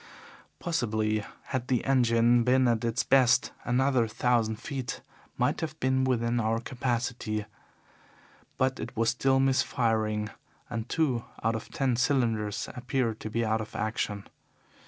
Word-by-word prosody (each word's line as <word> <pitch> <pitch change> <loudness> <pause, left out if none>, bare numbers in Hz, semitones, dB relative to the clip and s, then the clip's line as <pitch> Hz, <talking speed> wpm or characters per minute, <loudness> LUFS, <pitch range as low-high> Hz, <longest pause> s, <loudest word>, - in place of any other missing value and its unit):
Possibly, 110 -9 0 0.2
had 130 -2 -3
the 125 -3 0
engine 120 -2 +4
been 130 +1 +4
at 115 -1 +1
its 115 0 0
best, 130 -2 +4
another 125 -1 +2
thousand 115 -1 +1
feet 130 +1 -5 0.4
might - - +1
have 155 -1 -4
been 130 0 +2
within 120 -2 +1
our 115 0 +1
capacity, 120 -3 -2 1.1
but 130 0 +1
it 115 +1 -7
was 115 0 +3
still 135 +2 +2
misfiring, 110 -5 +1 0.4
and 115 0 -4
two 130 -8 0 0.2
out 115 - +2
of 110 - -5
the - - -19
ten 130 -3 +1
cylinders 115 -6 0
appeared 125 -2 -1
to 110 - -5
be 115 +1 0
out 110 0 +1
of 110 0 -9
action. 110 -2 -2
120 Hz, 140 wpm, -28 LUFS, 110-130 Hz, 1.1 s, engine